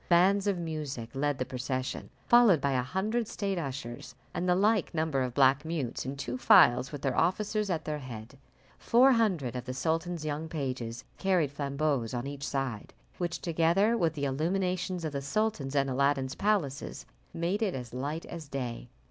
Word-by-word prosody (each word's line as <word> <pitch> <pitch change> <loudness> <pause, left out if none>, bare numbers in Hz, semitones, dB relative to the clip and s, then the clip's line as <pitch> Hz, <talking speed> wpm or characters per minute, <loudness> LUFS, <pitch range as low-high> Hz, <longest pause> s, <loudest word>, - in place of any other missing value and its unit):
Bands 190 +3 +4
of 200 -2 +1
music 150 -8 -4
led 145 +1 0
the 130 - -2
procession, 130 +1 -4 0.2
followed 235 -9 +6
by 140 0 0
a 130 -2 +2
hundred 210 - -1
state 195 -4 -2
ushers, 135 -3 -6 0.2
and 180 +1 -1
the 180 - +5
like 205 -2 +2
number 155 -4 0
of 125 -1 -2
black 135 +1 +4
mutes, 150 -7 -3
in 135 - -3
two 125 -2 -4
files, 125 +2 +6
with 145 -2 -7
their 135 -3 0
officers 210 +4 +1
at 165 -4 -1
their 150 -1 -2
head. 120 -1 -9 0.4
Four 255 +3 +5
hundred 185 - +1
of 125 -1 -4
the 130 - -5
sultan's 165 +2 -1
young 155 +1 -3
pages 130 -6 -4 0.2
carried 180 -7 +2
flambeaux 140 -3 -1
on 120 +1 -3
each 140 0 -5
side, 135 -6 -3 0.2
which, 175 -1 -2
together 170 +6 +2
with 165 -8 +1
the 145 -1 -2
illuminations 180 +4 -1
of 155 - -2
the 140 - -2
sultan's 145 -3 -1
and 140 -1 +3
Aladdin's 135 0 +1
palaces, 170 -10 -1 0.3
made 175 +5 -1
it 200 -5 0
as 125 -3 -7
light 145 +6 -3
as 165 -3 -8
day. 125 -3 -5
150 Hz, 180 wpm, -30 LUFS, 130-180 Hz, 0.4 s, followed